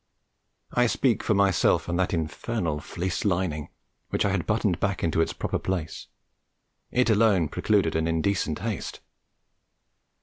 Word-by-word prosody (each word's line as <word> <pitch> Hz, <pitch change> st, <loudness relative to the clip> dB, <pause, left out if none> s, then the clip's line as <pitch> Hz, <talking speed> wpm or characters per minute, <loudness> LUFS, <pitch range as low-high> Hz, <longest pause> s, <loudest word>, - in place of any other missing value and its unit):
I 125 Hz, 0 st, +3 dB
speak 120 Hz, 0 st, +1 dB
for 110 Hz, -, +1 dB
myself 100 Hz, -3 st, +3 dB
and 85 Hz, +1 st, -1 dB
that 95 Hz, -, +1 dB
infernal 80 Hz, 0 st, -2 dB
fleece 90 Hz, +4 st, -3 dB
lining, 85 Hz, -6 st, -1 dB, 0.4 s
which -, -, 0 dB
I 100 Hz, -, +2 dB
had 95 Hz, -3 st, -1 dB
buttoned 105 Hz, -5 st, +1 dB
back 100 Hz, -3 st, -1 dB
into 80 Hz, 0 st, +2 dB
its -, -, 0 dB
proper -, -, -3 dB
place. 85 Hz, -4 st, -4 dB, 0.8 s
It 125 Hz, -2 st, +2 dB
alone 105 Hz, -7 st, +3 dB
precluded -, -, +1 dB
an 80 Hz, 0 st, +1 dB
indecent 80 Hz, -1 st, 0 dB
haste. -, -, -4 dB
95 Hz, 140 wpm, -26 LUFS, 80-105 Hz, 0.8 s, I